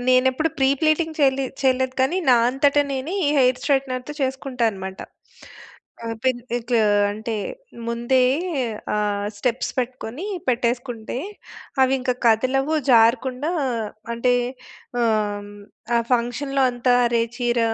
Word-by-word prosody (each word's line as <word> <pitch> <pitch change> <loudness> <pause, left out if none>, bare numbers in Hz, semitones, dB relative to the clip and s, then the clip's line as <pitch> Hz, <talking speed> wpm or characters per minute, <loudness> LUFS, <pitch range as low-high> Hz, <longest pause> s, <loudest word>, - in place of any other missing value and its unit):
నేనెప్పుడు 260 +4 +3
ప్రీ 265 -1 +4
ప్లీటీంగ్ 315 0 +1
చే‌‌లి 270 -1 +3 0.2
చేయలేదు 260 -1 +1
కానీ, 280 +8 +2
నా 245 - +7
అంతట 275 +2 +2 0.2
నేనే, 275 +8 -3
ఈ - - +3
హెయిర్ 255 -1 +3
స్ట్రెయిగ్టెనర్‌తో 265 0 -1
చేసుకుంటా 265 -2 -2
అనమాట. 190 -1 -7 1.1
ఆహ్, 230 - -3
పెన్ 255 -2 +1 0.2
ఇట్లు 240 0 0 0.3
అంటే, 220 +2 -4 0.5
ముందే 240 +2 +2 0.7
ఆహ్, 205 -1 -1
స్టెప్స్ 245 +3 -1
పెట్టుకొని 255 - -4 0.2
పెట్టేసుకుంటే, 240 -1 -1 0.7
అవి 260 0 +3
ఇంకా 250 -1 0
కదలవు, 260 +6 +2 0.2
జారకుండా 250 +5 +3 0.6
అంటే, 245 +1 +2 0.7
ఆహ్, 210 -2 0 0.5
ఆ - - +4
ఫంక్షన్‌లో 260 +3 +1
అంతా 245 +1 +2
అరే 235 -1 +2 0.2
చీర 240 -1 +1
255 Hz, 115 wpm, -22 LUFS, 235-265 Hz, 1.1 s, నా